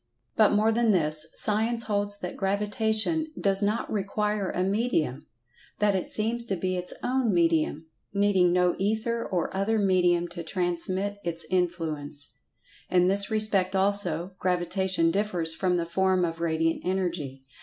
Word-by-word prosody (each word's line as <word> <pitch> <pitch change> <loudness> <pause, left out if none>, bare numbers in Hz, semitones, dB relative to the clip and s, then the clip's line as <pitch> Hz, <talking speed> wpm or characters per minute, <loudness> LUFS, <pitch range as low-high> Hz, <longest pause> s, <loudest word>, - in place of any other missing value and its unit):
But 215 - +4
more 215 +2 +3
than 230 0 +1
this. 155 -5 +1
Science 225 +2 +2
holds 205 -2 -1
that 180 - -5
Gravitation 215 +9 +1
does 195 0 +2
not 210 +2 0
require 210 0 -1
a 180 - -1
medium—that 210 - -2
it 185 - -2
seems 230 +2 -1
to 200 - -2
be 185 +1 -2
its 180 0 +2
own 255 -3 +1
medium—needing 175 +3 +1
no 180 0 +2
"Ether" 220 +4 -1
or 180 0 -3
other 205 +3 +1
medium 180 -3 +2
to 170 0 -7
transmit 185 +4 -2
its 170 -1 -2
in[Pg 180 -2 +1
144]fluence. 145 -3 -5 0.6
In 180 -1 +3
this 200 +1 +3
respect 205 -3 +1
also, 190 -3 +1
Gravitation 180 -1 +1
differs 180 -5 0
from 180 +1 0
the 170 - -1
form 185 +1 +1
of 165 0 -5
Radiant 165 0 0
Energy. 175 -8 -3
190 Hz, 145 wpm, -26 LUFS, 175-210 Hz, 0.6 s, But